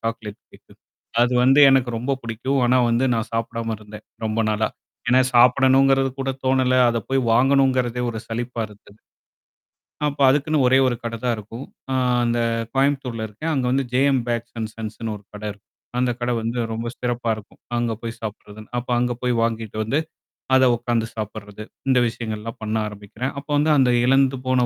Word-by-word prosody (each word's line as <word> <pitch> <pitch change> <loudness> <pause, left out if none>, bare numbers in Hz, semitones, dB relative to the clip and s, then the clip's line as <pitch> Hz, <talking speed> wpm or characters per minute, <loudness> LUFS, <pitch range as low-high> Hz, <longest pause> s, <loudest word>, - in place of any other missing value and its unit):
Chocolate 115 -2 -5
கேக்கு. - - -19 0.5
அது 120 +1 +2
வந்து 135 +3 +6
எனக்கு 130 -2 +3
ரொம்ப 135 +3 -1
பிடிக்கும். 120 +4 -2
ஆனா 125 +1 +4
வந்து, 120 +3 +2
நான் 115 0 -2
சாப்பிடாம 115 0 -2
இருந்தேன். 105 0 -12 0.2
ரொம்ப 110 +1 0
நாளா. 110 0 0 0.4
ஏன்னா 130 +1 +6
சாப்பிடணுங்கிறது 135 +2 +5
கூட 135 - -1
தோணல. 130 -1 +2
அத 115 0 0
போய் 135 0 +2
வாங்கணுங்கிறதே 130 -1 +3
ஒரு 110 -1 -5
சலிப்பா 120 +1 -4
இருக்குது. 105 0 -18 1.1
அப்ப 145 0 -6
அதுக்குன்னு 145 0 +2
ஒரே 130 +1 +5
ஒரு 125 -2 0
கடை 115 0 -4
தான் 120 -2 +2
இருக்கும். 115 +5 -8 0.3
அ - - 0 0.3
அந்த 120 0 0 0.4
கோயம்புத்தூர்ல 135 -5 0
இருக்கேன். 150 +11 -4
அங்க 130 -3 0
வந்து 135 +1 +1
"ஜே-எம் 135 -1 +3
பேக்ஸ் 120 0 -3
அன் 110 -1 -3
சன்ஸ்ன்னு" 110 0 -5
ஒரு 105 - -15
கடை 105 +1 -5
இருக்கும். 105 0 -25 0.3
அந்த 125 0 +2
கடை 120 0 0
வந்து 115 +2 -2 0.2
ரொம்ப 115 +1 -4
சிறப்பா 120 -1 -1
இருக்கும். 105 - -15 0.2
அங்க 120 -1 0
போய் 115 0 -6
சாப்படுறதுன்னு. 105 0 -8
அப்ப 120 - -14
அங்க 125 0 +1
போய் 125 -1 +1
வாங்கிட்டு 115 -2 -2
வந்து, 135 +8 +1 0.6
அத 130 - +5
உக்காந்து 120 -1 -1
சாப்படுறது. 105 -1 -7 0.3
இந்த 130 -1 +5
விஷயங்கள்லாம் 115 -1 -5
பண்ண 110 0 -2
ஆரம்பிக்கிறேன். 105 +5 -6
அப்போ 140 - -15
வந்து 150 +2 +3
அந்த 130 -2 +4
இழந்து 135 +1 +4
போன 130 -1 +3
120 Hz, 170 wpm, -22 LUFS, 110-130 Hz, 1.1 s, வந்து